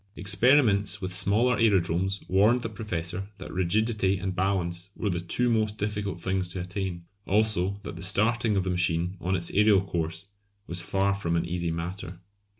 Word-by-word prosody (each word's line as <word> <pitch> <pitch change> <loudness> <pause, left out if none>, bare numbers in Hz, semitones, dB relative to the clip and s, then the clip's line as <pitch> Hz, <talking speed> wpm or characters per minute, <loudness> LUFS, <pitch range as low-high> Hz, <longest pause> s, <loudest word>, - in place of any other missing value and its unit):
Experiments 100 +2 +3
with 95 -1 -3
smaller 115 +7 +3
aerodromes 95 -3 +1
warned 110 +6 +3
the 115 - -3
Professor 95 -3 -4
that 95 - -9
rigidity 100 +2 +1
and 95 0 -4
balance 90 -1 -1
were 105 - -2
the 85 - -2
two 90 +8 0
most 110 -2 +1
difficult 105 -3 -3
things 95 +1 -1
to 90 +1 -6
attain; 90 -1 -4 0.2
also 100 -2 +1
that - - -7
the - - -8
starting 110 +3 +2
of 95 - +1
the 90 - -2
machine 90 0 0
on 95 +2 0
its 85 -2 -1
aerial 105 -1 +4
course 85 0 -4 0.4
was 85 +1 -4
far 100 +3 0
from 85 -4 -2
an 85 0 0
easy 85 0 -2
matter. 85 +2 -5
95 Hz, 170 wpm, -27 LUFS, 90-105 Hz, 0.4 s, aerial